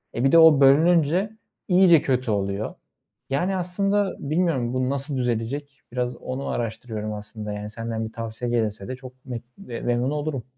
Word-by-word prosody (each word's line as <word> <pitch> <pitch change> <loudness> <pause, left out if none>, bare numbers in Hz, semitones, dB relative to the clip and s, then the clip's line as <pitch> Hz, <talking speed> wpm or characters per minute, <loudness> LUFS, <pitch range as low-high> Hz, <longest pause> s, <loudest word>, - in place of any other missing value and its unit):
E, 120 - -1
bir 135 - +4
de 165 - +7
o 160 -3 +8
bölününce 165 +6 +5 0.4
iyice 180 -4 +6
kötü 125 -3 0
oluyor. 100 +1 -1 0.6
Yani, 180 +8 0
aslında 195 +2 0
bilmiyorum 145 -5 0
bu 130 0 0
nasıl 140 0 -3
düzelecek? 130 +4 -2
Biraz 125 0 -1
onu 130 +2 -5
araştırıyorum 110 -2 -3
aslında. 105 0 -6
Yani, 105 0 -5
senden 115 0 -4
bir 110 - -8
tavsiye 115 +1 -4
gelirse 110 -4 -1
de 130 - -4
çok 130 0 -13
me 120 -3 -5 0.2
memnun 120 -6 -2
olurum. 150 -4 -2
130 Hz, 160 wpm, -24 LUFS, 115-150 Hz, 0.6 s, o